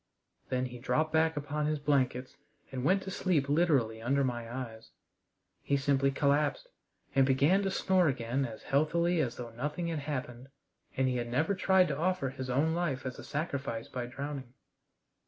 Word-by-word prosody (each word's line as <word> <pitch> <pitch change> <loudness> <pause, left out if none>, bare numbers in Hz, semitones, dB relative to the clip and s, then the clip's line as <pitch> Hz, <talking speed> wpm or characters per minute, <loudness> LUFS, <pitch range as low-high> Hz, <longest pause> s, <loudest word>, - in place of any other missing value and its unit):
Then 130 0 0
he 125 -1 -7
dropped 155 +5 0
back 160 0 +3
upon 150 +1 -1
his 155 0 0
blankets 130 -3 0 0.4
and 130 -2 -4
went 190 +6 +3
to 190 - -6
sleep 170 -8 +1
literally 140 -8 +2
under 135 +4 +2
my 120 -3 -3
eyes. 115 -3 -7 0.7
He 140 - +1
simply 135 0 +2
collapsed, 145 - +1 0.4
and 135 - +5
began 140 +9 +4
to 195 - 0
snore 185 -2 +2
again 130 0 0
as 115 -4 -6
healthily 170 +5 +2
as 125 -6 0
though 120 -1 -7
nothing 150 +8 -3
had 160 -2 -2
happened 130 -3 -5 0.5
and 130 0 +3
he 125 -1 0
had 120 -1 -3
never 155 +10 +1
tried 190 -1 +4
to 140 - -2
offer 180 -5 0
his 130 -1 -6
own 145 +6 +2
life 160 -7 -1
as 130 - -5
a - - -8
sacrifice 140 -7 -3
by 125 -1 -4
drowning. 135 0 -6
140 Hz, 175 wpm, -31 LUFS, 125-160 Hz, 0.7 s, and